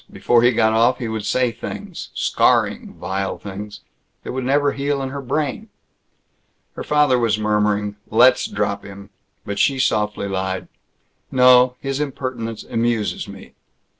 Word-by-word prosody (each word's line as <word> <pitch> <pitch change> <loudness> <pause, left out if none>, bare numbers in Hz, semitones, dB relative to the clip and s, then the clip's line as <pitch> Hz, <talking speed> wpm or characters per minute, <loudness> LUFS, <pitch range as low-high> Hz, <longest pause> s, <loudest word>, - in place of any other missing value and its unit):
Before 120 -1 +2
he 120 - +5
got 110 -2 +2
off 120 +3 +3
he 120 - -4
would 110 -2 -4
say 125 -2 +1
things - - -7
scarring, - - +1
vile 95 0 -3
things, 105 +1 -8 0.4
that - - -5
would 130 0 -3
never 140 +2 +2
heal 140 0 -1
in 135 - -3
her 140 +1 -5
brain. 150 - -2 1.0
Her - - -6
father 150 -4 +3
was 115 -3 +1
murmuring, 105 -1 0
"Let's 125 +3 +5
drop - - -2
him," 100 0 -11 0.3
but 100 -1 -4
she 135 -2 +3
softly 105 -5 0
lied, 95 -1 -3 0.6
"No. 125 -1 +6
His 135 0 -3
impertinence 130 -6 -4
amuses 115 -2 -1
me." - - -12
120 Hz, 145 wpm, -20 LUFS, 105-130 Hz, 1.0 s, No